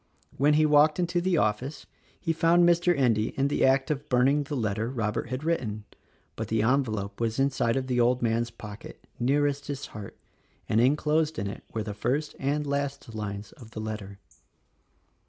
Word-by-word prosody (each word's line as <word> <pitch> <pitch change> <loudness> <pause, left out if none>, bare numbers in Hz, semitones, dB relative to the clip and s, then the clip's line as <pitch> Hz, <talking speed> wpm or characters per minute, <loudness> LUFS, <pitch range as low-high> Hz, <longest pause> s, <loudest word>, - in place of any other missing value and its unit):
When 145 +3 +3
he 155 0 +4
walked 150 0 +5
into 175 -1 0
the 180 -1 +1
office 125 +5 -1 0.3
he 165 - -1
found 170 +2 +4
Mr. 175 -1 +3
Endy 115 -5 +1
in 140 +1 +2
the - - 0
act 135 +3 +3
of 145 0 -4
burning 135 +4 +3
the 145 +1 -4
letter 110 -2 -1
Robert 115 -2 -2
had 130 +3 -4
written; 115 -11 -1 0.3
— - - -38
but 110 - -4
the 110 0 +1
envelope 110 -5 0
was 115 -1 0
inside 135 -4 +1
of 135 -1 -1
the 125 -1 0
old 120 +1 +3
man's 115 0 0
pocket, 105 -2 -11
nearest 145 +3 +1
his 140 -1 -4
heart, 105 -2 -8 0.5
and 110 - +3
enclosed 150 +4 +2
in 100 - -2
it 100 - -6
were 110 - -2
the 105 -1 -5
first 130 +8 -2
and 145 +2 0
last 140 -4 -3
lines 105 -1 -5
of 115 -3 -14
the 110 - -8
letter. 105 -2 -6
130 Hz, 185 wpm, -27 LUFS, 110-145 Hz, 0.5 s, walked